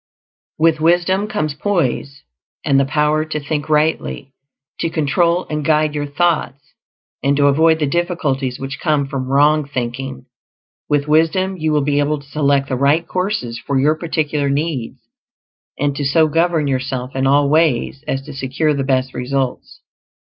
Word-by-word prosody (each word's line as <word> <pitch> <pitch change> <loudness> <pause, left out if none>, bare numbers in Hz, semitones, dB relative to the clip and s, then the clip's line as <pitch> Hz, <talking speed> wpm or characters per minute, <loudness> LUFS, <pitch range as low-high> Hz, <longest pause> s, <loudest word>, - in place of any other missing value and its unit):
With 160 0 +3
wisdom 175 +5 +2
comes 180 -9 -2
poise, 140 -5 -2 0.4
and 135 -1 +3
the 135 - +2
power 150 +2 +1
to 155 -1 -3
think 145 +1 -4
rightly; 150 -3 0 0.5
to 165 - 0
control 170 +3 +1
and 150 -1 -3
guide 155 0 +2
your 145 -1 -3
thoughts, 150 -2 -1 0.5
and 140 0 +1
to 145 - +3
avoid 160 +3 +4
the 155 - 0
difficulties 140 -5 -1
which 135 0 -6
come 150 -4 +1
from 135 -2 -4
wrong 145 +3 +3
thinking. 130 - -5 0.6
With 145 0 +1
wisdom 165 +5 +2
you 160 -3 -1
will 150 -1 +2
be 145 0 +1
able 145 +1 +1
to 140 - -16
select 140 -2 +1
the 130 - 0
right 145 +6 +2
courses 180 - -2
for 135 +4 -1
your 150 +3 +3
particular 155 -3 -1
needs, 140 -4 -2 0.8
and 145 -1 0
to 145 - -3
so 155 +3 +3
govern 165 0 +1
yourself 130 -1 -3
in 135 0 +1
all 140 +1 +4
ways 150 -3 +1
as 135 0 -2
to 150 - -9
secure 140 +3 -1
the 140 -1 -1
best 130 -1 0
results. 130 +1 -3
145 Hz, 165 wpm, -18 LUFS, 135-160 Hz, 0.8 s, avoid